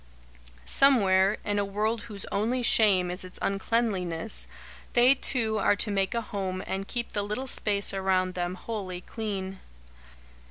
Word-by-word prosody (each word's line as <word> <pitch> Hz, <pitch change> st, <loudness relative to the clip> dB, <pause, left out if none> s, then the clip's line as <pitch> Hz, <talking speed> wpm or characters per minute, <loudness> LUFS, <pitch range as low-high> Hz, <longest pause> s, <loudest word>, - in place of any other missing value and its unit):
Somewhere, 200 Hz, -, +4 dB
in 205 Hz, 0 st, 0 dB
a -, -, +1 dB
world 210 Hz, +3 st, -1 dB
whose 215 Hz, -4 st, -8 dB
only 230 Hz, +5 st, 0 dB
shame 195 Hz, -6 st, +4 dB
is 180 Hz, -, -5 dB
its 185 Hz, 0 st, -9 dB
uncleanliness, 195 Hz, -2 st, 0 dB, 0.5 s
they 245 Hz, +2 st, +6 dB
two 225 Hz, -5 st, +2 dB
are 205 Hz, -, +3 dB
to 210 Hz, +1 st, -2 dB
make 195 Hz, +1 st, -1 dB
a 235 Hz, -, 0 dB
home 190 Hz, -3 st, -4 dB
and 195 Hz, +1 st, -4 dB
keep 240 Hz, -1 st, -4 dB
the 205 Hz, -, -1 dB
little 210 Hz, +6 st, -4 dB
space 205 Hz, -6 st, +1 dB
around 190 Hz, -1 st, 0 dB
them 175 Hz, 0 st, -3 dB
wholly 185 Hz, -3 st, -6 dB
clean. 195 Hz, -3 st, -5 dB
200 Hz, 150 wpm, -27 LUFS, 190-225 Hz, 0.5 s, they